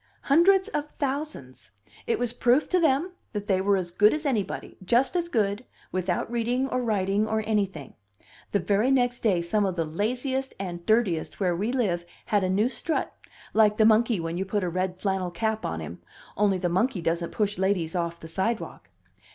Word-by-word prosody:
"Hundreds 375 +7 +4
of 300 -5 -3
thousands. 275 - -4 0.4
It 235 - +1
was 240 -1 -1
proof 245 +4 +3
to 365 - +3
them 320 +2 +2 0.2
that 205 -1 -3
they 190 -2 +1
were 200 0 +3
as 175 -2 -3
good 210 +7 +4
as 305 +1 -5
anybody 220 -9 -2
just 240 - +2
as 340 -1 0
good, 210 -3 0 0.3
without 185 +3 -1
reading 240 +3 0
or 255 - 0
writing 205 -2 +1
or 220 0 0
anything. 195 -10 -1 0.6
The - - +3
very 205 +7 +2
next 245 -2 +2
day 185 -7 +1
some 205 +5 +1
of 190 -2 -1
the 165 -2 0
laziest 250 - -2
and 175 -3 -5
dirtiest 215 -8 +1
where 180 -3 +1
we 205 +7 -1
live 185 -9 -1 0.2
had 205 -4 +1
a 185 - 0
new 205 +5 +2
strut, 315 +5 -2 0.4
like 215 -1 +4
the 220 - +5
monkey 225 -1 +4
when 165 +1 -3
you - - 0
put 200 +1 -1
a 180 - 0
red 185 +1 -2
flannel 190 -2 -1
cap 220 +5 -2
on 80 0 -4
him 85 +3 -8 0.3
only 200 -2 +2
the 180 - -1
monkey 190 +5 +1
doesn't 170 +1 -1
push 205 -2 -1
ladies 185 -3 0
off 170 -1 -2
the 160 - -9
sidewalk. 190 +7 -3
205 Hz, 190 wpm, -26 LUFS, 180-245 Hz, 0.6 s, the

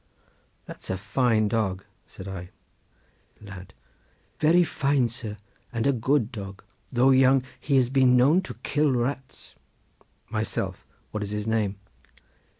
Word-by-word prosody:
"That's - - -10
a 95 - -1
fine 110 +2 +1
dog," 100 -3 -1 0.2
said 95 - -10
I. 90 -2 -6 0.9
Lad.—Very 95 - -2
fine, 140 -6 +1
sir, 110 -3 -6 0.3
and 115 -1 -2
a 140 - +4
good 125 0 +1
dog; 100 -4 -8 0.3
though 130 +1 +4
young, 130 0 +5 0.2
he 140 - 0
has 125 -2 +3
been 130 -2 +5
known 145 +9 +5
to - - -6
kill 150 +1 +2
rats. 130 +2 -3 0.7
Myself.—What 105 - -4
is 105 - -3
his 105 0 -3
name? 110 -3 0
120 Hz, 125 wpm, -26 LUFS, 105-135 Hz, 0.9 s, young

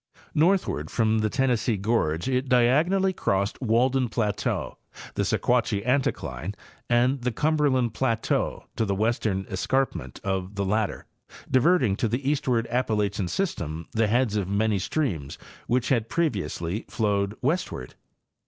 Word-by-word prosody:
Northward 160 - +2
from 110 -1 +2
the 110 0 +1
Tennessee 125 -3 +1
gorge 95 -4 0
it 130 0 0
diagonally 155 +11 +3
crossed 100 - -1
Wal 120 +1 +3
den 130 -2 0
plateau, 105 -2 -2 0.3
the - - -1
Sequatchie 115 -4 +1
anticline 100 - -1 0.3
and 125 +2 +2
the 125 +1 0
Cumberland 140 -4 +1
plateau 115 -3 -1
to - - +2
the 100 -1 0
western 105 -2 0
escarpment 95 - -1
of 95 0 -2
the 100 0 -1
latter, 105 +1 -1 0.5
diverting 130 - +4
to 115 - +1
the 125 +5 -2
eastward 130 -5 +1
Appalachian 105 -6 0
system 85 - -3
the 110 -1 +2
heads 120 0 +1
of 100 -3 -1
many 105 0 +1
streams 90 - -2 0.3
which 125 0 +1
had 115 -4 +1
previously 100 - -1
flowed 100 -2 0
westward. 135 - -1
115 Hz, 135 wpm, -26 LUFS, 100-130 Hz, 0.5 s, diverting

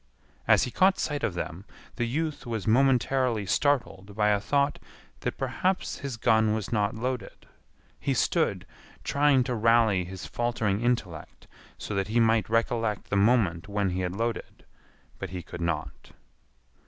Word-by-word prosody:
As - - +5
he 125 - -3
caught 190 +6 +3
sight 145 -1 -2
of 90 - -1
them 90 +1 -5 0.3
the 120 -1 0
youth 155 +2 -3
was 115 -4 -3
momentarily 125 -2 +2
startled 105 -4 0
by 105 0 +2
a 105 -1 +3
thought 140 +6 0 0.4
that - - -3
perhaps 185 0 -1
his 135 -4 -5
gun 110 -1 +3
was 110 -3 -4
not 105 -2 0
loaded. 125 +2 -4 0.5
He - - -1
stood - - +1 0.4
trying 140 -2 +3
to 125 0 -3
rally 115 -4 +3
his 95 0 -8
faltering 115 -4 -1
intellect 100 -10 -2 0.3
so - - -6
that 100 -1 -1
he 115 +3 +1
might 115 -2 +3
recollect 115 -1 0
the - - +1
moment 100 -5 +2
when 100 -2 -1
he 90 - -2
had 90 0 -3
loaded, 115 +1 -4 0.5
but - - -5
he 90 0 -6
could 85 - -9
not. 85 -3 -3
115 Hz, 155 wpm, -27 LUFS, 100-125 Hz, 0.5 s, As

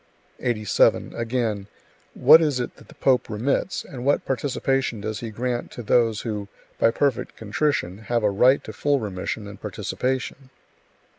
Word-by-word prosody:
87. 110 -4 +2
Again: 115 -4 -2 0.5
"What 150 +6 +8
is 145 -5 +1
it 125 - -4
that - - -17
the - - -16
pope 130 -3 +2
remits, 125 - -1
and 125 -3 -8
what 140 +2 +2
participation 135 -2 -1
does 110 0 -4
he 115 - -5
grant 120 +2 -3
to 120 - -7
those 115 -1 +2
who, 105 -3 -4 0.3
by - - +5
perfect 135 +2 -1
contrition, 105 - -1
have 115 +1 -1
a 105 - +3
right 125 +7 +4
to 110 - -8
full 145 +6 +1
remission 105 0 -4
and 100 - -11
participation?" 130 +1 -3
120 Hz, 155 wpm, -24 LUFS, 105-130 Hz, 0.5 s, What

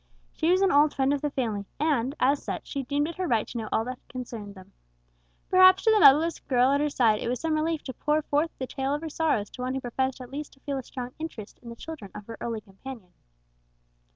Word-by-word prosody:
She 320 - 0
was 370 +2 +4
an 390 - +4
old 290 +1 +4
friend 270 0 +2
of 285 - -1
the 295 - 0
family, 220 -7 -2
and, 280 -3 +1
as 275 +3 +3
such, - - -5
she 280 - -3
deemed 285 +3 0
it 335 - -7
her 370 -1 -1
right 230 -6 +1
to - - -5
know 215 -1 -5
all 225 - +1
that 255 0 -5
concerned 230 -5 -7
them. 190 +1 -14 0.8
Perhaps 370 0 +7
to 445 - +5
the 435 - +5
motherless 320 +1 +6
girl 255 -1 +2
at 280 +1 +2
her 300 - +1
side 225 -6 +3
it - - -3
was 250 - -1
some 325 -1 -1
relief 310 0 0
to 260 - -6
pour 300 +5 0
forth 295 +3 +1
the 260 - -3
tale 270 +2 -2
of 295 - -5
her 325 - -5
sorrows 295 -10 0
to - - -9
one 255 +1 -2
who - - -1
professed 260 +1 -2
at 250 -1 -10
least 295 +2 -6
to 270 - -22
feel 280 -2 -3
a - - -7
strong 250 0 -6
interest 240 -10 -7
in 235 - -10
the 235 - -8
children 300 -6 -8
of 210 - -8
her 225 +1 -8
early 230 -2 -3
companion. 195 -1 -11
270 Hz, 255 wpm, -27 LUFS, 235-300 Hz, 0.8 s, Perhaps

